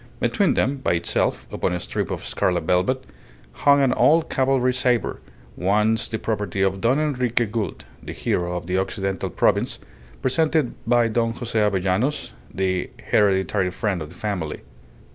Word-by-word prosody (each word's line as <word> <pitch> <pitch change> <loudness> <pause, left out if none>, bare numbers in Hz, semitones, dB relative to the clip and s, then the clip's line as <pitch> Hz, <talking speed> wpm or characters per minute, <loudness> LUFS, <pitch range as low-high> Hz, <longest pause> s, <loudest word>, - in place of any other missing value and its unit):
Between 200 -4 +2
them, 140 +2 +1
by 130 - 0
itself, 85 0 0
upon - - -1
a 90 - -1
strip - - -3
of - - -4
scarlet 90 -2 0
velvet, 90 +10 +1 0.5
hung 140 -1 +4
an 135 - +3
old 160 +1 +3
cavalry 130 -1 +2
sabre, 125 -3 0 0.4
once 105 +4 +1
the 110 - -3
property 105 -4 -2
of 95 0 0
Don 125 +4 +3
Enrique 125 -6 +1
Gould, 105 -3 -4 0.2
the - - -7
hero 90 0 -1
of 85 - -6
the 90 +2 0
Occidental 95 0 -2
Province, - - +1 0.5
presented 155 0 +1
by 120 -1 +4
Don 115 0 0
Jose 115 -2 -2
Avellanos, 105 +6 0 0.2
the 95 -1 -1 0.2
hereditary 95 -1 +2
friend 95 -1 -2
of 75 - -6
the - - -14
family. 95 -8 -3
105 Hz, 155 wpm, -23 LUFS, 95-125 Hz, 0.5 s, hung